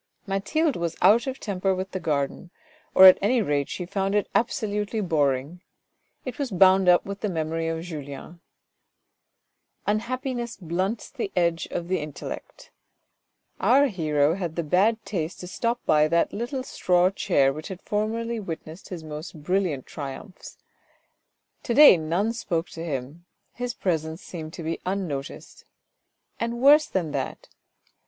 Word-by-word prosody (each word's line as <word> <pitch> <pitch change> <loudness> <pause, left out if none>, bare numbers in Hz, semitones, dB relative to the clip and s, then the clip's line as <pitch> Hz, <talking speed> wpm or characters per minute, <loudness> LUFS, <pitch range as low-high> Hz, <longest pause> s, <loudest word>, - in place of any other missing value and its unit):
Mathilde 255 +11 0
was 170 -1 -2
out 235 +6 +5
of 265 0 -4
temper 195 -2 -1
with 185 0 -4
the 185 - -3
garden, 150 +1 -2 0.5
or 190 - +10
at 185 - +10
any 235 +5 +3
rate 145 -9 0
she 180 - -4
found 195 +2 -1
it 205 - +1
absolutely 210 -1 -1
boring: 150 -2 0 0.6
it 255 - -6
was 280 -3 -1
bound 190 -1 +5
up 175 - +5
with 200 0 -6
the 210 - -1
memory 165 -1 -2
of 165 0 -3
Julien. 155 0 -8 1.4
Unhappiness 240 +3 -2
blunts 185 +5 -3
the 240 -8 -4
edge 170 -1 +1
of 170 - -4
the 185 0 0
intellect. 150 -2 -8 0.9
Our 265 +7 +4
hero 155 - +1
had 175 -3 -4
the 170 - -1
bad 200 +8 +2
taste 170 -4 -3
to 180 - -7
stop 235 +6 -2
by 150 0 +4
that 170 +1 +1
little 250 +4 -3
straw 180 -6 +2
chair 135 -8 +2
which 155 +2 -7
had 190 -1 -8
formerly 225 +2 -2
witnessed 165 -2 -8
his 175 -4 -6
most 155 0 -8
brilliant 180 -6 0
triumphs. 145 +7 -8 1.0
To 235 - -2
day 295 -8 +10
none 175 +7 -1
spoke 175 -7 -2
to 165 - -7
him, 145 +2 -5 0.3
his 245 -1 -4
presence 160 -2 -2
seemed 160 -2 -8
to 165 - -7
be 165 +1 -3
unnoticed, 180 -8 -5 0.8
and 235 +1 -2
worse 290 +4 +6
than 170 -5 -2
that. 135 -2 -4
180 Hz, 150 wpm, -25 LUFS, 160-215 Hz, 1.4 s, or